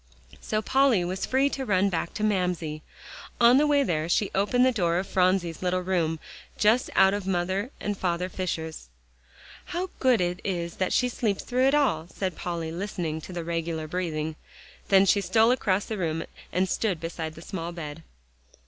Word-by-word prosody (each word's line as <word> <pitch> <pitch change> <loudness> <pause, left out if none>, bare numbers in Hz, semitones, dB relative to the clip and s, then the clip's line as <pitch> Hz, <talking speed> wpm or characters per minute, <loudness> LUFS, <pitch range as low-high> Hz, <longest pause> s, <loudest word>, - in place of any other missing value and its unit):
So 215 0 -1
Polly 260 -7 +3
was 185 +2 -3
free 265 +2 +3
to 270 - -3
run 200 -4 +2
back 170 -2 -3
to 215 - -3
Mamsie. 180 -7 0 0.6
On 240 +1 +7
the 300 - +3
way 290 -1 +4
there 165 - -1
she 200 +3 +1
opened 225 +6 +3
the 260 - +4
door 175 -7 +1
of 185 - -1
Phronsie's 180 -3 +1
little 185 0 0
room, 170 -4 0 0.4
just 220 +4 +3
out 190 0 +6
of 205 -2 -3
Father 190 +4 -1
and 205 -2 -3
Mother 180 0 0
Fisher's. 160 - -4 0.8
"How 360 +2 -4
good 255 -4 +4
it 180 0 -1
is 170 -3 -3
that 185 - 0
she 250 - +3
sleeps 220 -4 -1
through 255 +1 +2
it 275 - +3
all," 210 - +1
said 185 -1 -4
Polly, 170 -2 -4
listening 170 -3 -3
to 185 - -9
the 175 -2 -4
regular 165 -1 -3
breathing. 155 -2 -3 0.5
Then 195 0 +6
she 200 +2 +3
stole 220 +5 +4
across 205 -6 +1
the 215 -3 -4
room 165 -2 -1 0.3
and 185 +2 +1
stood 190 -2 -1
beside 165 -1 -5
the 165 - -11
small 170 -3 -5
bed. 165 -2 -7
185 Hz, 185 wpm, -26 LUFS, 170-215 Hz, 0.8 s, On